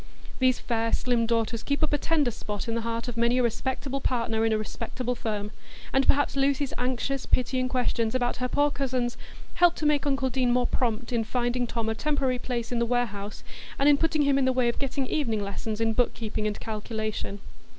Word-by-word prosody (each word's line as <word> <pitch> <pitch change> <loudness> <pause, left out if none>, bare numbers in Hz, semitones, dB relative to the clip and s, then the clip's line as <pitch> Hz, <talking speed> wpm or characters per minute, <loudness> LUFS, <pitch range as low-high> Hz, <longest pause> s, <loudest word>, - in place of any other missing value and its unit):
These 255 -1 +4
fair 230 -1 -1
slim 240 -2 +2
daughters 230 0 0
keep 280 +5 -1
up 305 - +1
a - - +4
tender 300 -6 +2
spot 210 -1 -5
in 230 - -1
the 230 - -1
heart 230 +1 -3
of 240 -1 -5
many 235 +1 +3
a 250 - +3
respectable 265 +3 -2
partner 230 -3 0
in 225 - +2
a 220 - +3
respectable 235 +3 -3
firm, 210 -3 -3 0.4
and 270 0 +3
perhaps 285 0 +3
Lucy's 275 0 +1
anxious, 255 +2 -1
pitying 255 0 +1
questions 245 -2 0
about 245 -1 0
her 250 - -1
poor 290 +3 +2
cousins 255 -3 -1 0.4
helped 350 -1 +4
to 310 - -2
make 295 -1 +2
uncle 270 -2 +1
Deane 250 -1 +1
more 245 0 +3
prompt 235 -1 -1
in 230 -1 +2
finding 245 +1 0
Tom 230 -1 -2
a 220 - +1
temporary 270 0 0
place 240 -2 -3
in 240 - 0
the 235 - +2
warehouse, 215 -4 -2 0.3
and 275 - +3
in 295 - +8
putting 315 -2 +2
him 280 -1 +3
in 265 - +2
the 260 - +4
way 250 -2 +2
of 235 - -3
getting 275 0 -1
evening 230 -7 0
lessons 210 +2 -4
in 225 0 +2
book 245 +2 +1
keeping 215 -1 -2
and 210 - -3
calculation. 215 -2 -4
245 Hz, 215 wpm, -27 LUFS, 225-270 Hz, 0.4 s, in